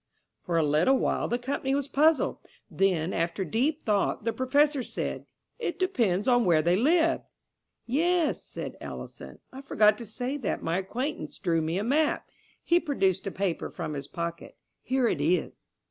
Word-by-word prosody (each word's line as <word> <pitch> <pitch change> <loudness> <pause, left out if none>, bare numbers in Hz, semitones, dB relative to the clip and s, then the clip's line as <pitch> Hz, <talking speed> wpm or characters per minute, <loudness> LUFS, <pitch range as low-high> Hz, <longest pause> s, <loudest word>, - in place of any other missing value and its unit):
For 170 -2 -1
a 165 - +3
little 155 - +3
while - - 0
the 240 - 0
company 270 +2 -1
was 285 -1 -1
puzzled. 305 +2 +2 0.3
Then, 185 -3 +1
after 170 +3 -1
deep 250 - 0
thought, 205 -2 +1
the 230 - +1
Professor 280 +4 +2
said: - - -4 0.3
"It 350 -9 -3
depends 230 - +1
on 245 -1 +4
where 165 -5 +3
they 175 +2 +3
lived." 325 - +3 0.6
"Yes," 330 +5 +1
said - - -7
Ellison. - - -8 0.2
"I 265 - -8
forgot 215 -5 +3
to 235 - -6
say 250 +6 -4
that 250 -8 -3
my 165 +3 0
acquaintance 250 +10 -4
drew 165 -3 +1
me 160 +3 -1
a 200 - -1
map." 295 +6 +1 0.4
He 345 0 +4
produced 195 - 0
a - - -2
paper 190 -3 -2
from 155 - -5
his 140 -1 -5
pocket. 170 +1 -6 0.2
"Here 260 -2 +1
it 155 - 0
is." 165 +3 -1
230 Hz, 170 wpm, -28 LUFS, 180-280 Hz, 0.6 s, on